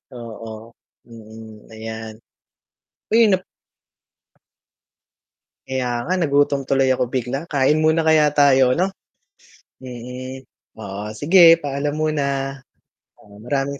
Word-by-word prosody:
Oo, 115 -1 -10 0.4
mm, 110 -1 -13
ayan. 110 0 -8 0.9
Uy 225 0 +5
nap 190 -2 +1 2.2
Kaya 130 -1 -2 0.2
nga 180 - -1
nagutom 145 -3 +2
tuloy 135 -1 +2
ako 130 - +1
bigla, 125 +1 -2
kain 145 +2 +2
muna 160 +1 +3
kaya 155 -1 +5
tayo 135 -3 +4
ano? 185 +3 0 0.9
Hmm, 130 +1 -8 0.3
oo 100 -2 -7 0.2
sige, 165 +1 +7
paalam 145 0 -3
muna, 155 -2 0 1.0
oo, 100 -1 -17
maraming 140 +1 -2
130 Hz, 100 wpm, -20 LUFS, 115-150 Hz, 2.2 s, sige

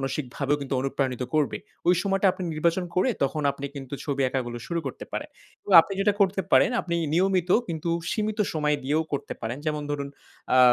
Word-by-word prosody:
মানসিকভাবেও 135 +1 -1
কিন্তু 135 -1 -3
অনুপ্রাণিত 130 -2 -1
করবে। 150 -2 +2 0.3
ওই 180 - +7
সময়টা 195 0 +1
আপনি 185 - -7
নির্বাচন 170 +4 +1
করে 185 - +3
তখন 150 +2 0
আপনি 140 0 -6
কিন্তু 135 -1 -6
ছবি 140 -2 -1
আঁকাগুলো 120 -2 -3
শুরু 170 -1 -1
করতে 130 - -5
পারেন। - - -4 0.3
এবং - - -4
আপনি 195 - -6
যেটা 205 +1 +3
করতে 195 0 +3
পারেন - - +6
আপনি 170 - -3 0.2
নিয়মিত 185 0 +2 0.2
কিন্তু 165 0 -2 0.2
সীমিত 215 -1 -1
সময় 150 -2 +1
দিয়েও 150 +4 +1
করতে 140 - -3
পারেন। 120 +3 -3
যেমন 150 -1 -1
ধরুন 140 -1 -2 0.5
আ - - +6
150 Hz, 185 wpm, -26 LUFS, 135-180 Hz, 0.5 s, ওই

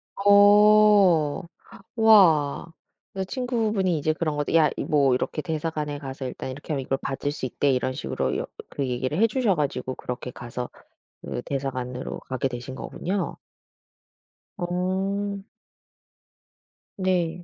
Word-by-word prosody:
어. 205 -5 +5 0.5
와. 170 - +4 0.4
그 190 0 -2
친구분이 220 - 0
이제 155 +2 +1
그런 155 -2 -2
거 145 - +1
"야 155 -2 +5
이 - - -3
뭐 140 -3 +3
이렇게 130 +4 -2
대사관에 155 -3 -3
가서 135 -1 -6
일단 130 +1 -5
이렇게 145 +4 -6
하면 140 - -1
이걸 135 +1 -1
받을 135 +1 -3
수 145 - -5
있대." 140 +2 0
이런 130 0 0
식으로 - - -2
여 - - -4 0.2
그 140 - -3
얘기를 130 +5 -2
해 225 - +5
주셔 230 -3 +1
가지고 140 -4 -2
그렇게 125 0 -6
가서 125 0 -6 0.5
그 - - -4
대사관으로 130 -2 -4
가게 130 0 -1
되신 125 +1 -7
거군요. 185 +8 -3 1.2
어. 195 +2 -2 1.5
네. 180 -3 0
155 Hz, 255 characters per minute, -25 LUFS, 135-195 Hz, 1.5 s, 어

